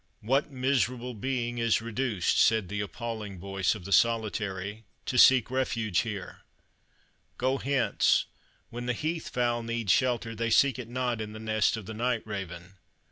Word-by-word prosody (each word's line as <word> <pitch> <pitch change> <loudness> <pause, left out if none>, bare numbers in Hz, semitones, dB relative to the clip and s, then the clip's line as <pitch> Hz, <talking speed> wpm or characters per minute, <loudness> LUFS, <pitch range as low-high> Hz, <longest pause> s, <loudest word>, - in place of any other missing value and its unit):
"What 135 +7 +1
miserable 125 -2 0
being 120 +1 -2
is 115 -1 +2
reduced," 115 -4 0
said 110 -5 +3
the 105 0 -2
appalling 110 -2 -5
voice 95 +2 -1
of 95 -5 -10
the 100 - -7
Solitary, 105 -1 +1 0.2
"to - - -3
seek 130 -1 +6
refuge 115 -7 0
here? 105 -5 -4 1.0
Go 130 +2 0
hence; 135 -2 +2 0.5
when 120 +1 -6
the 125 - +1
heath 160 +6 -3
fowl 120 -1 0
need 115 -3 -1
shelter, 120 -1 +1
they 115 +1 -2
seek 135 +1 +4
it 115 -2 -7
not 120 -2 -1
in 105 0 -6
the 110 - -8
nest 110 0 +1
of 110 - -7
the 110 - -6
night 120 +1 -1
raven." 95 -3 -7
115 Hz, 160 wpm, -28 LUFS, 105-125 Hz, 1.0 s, seek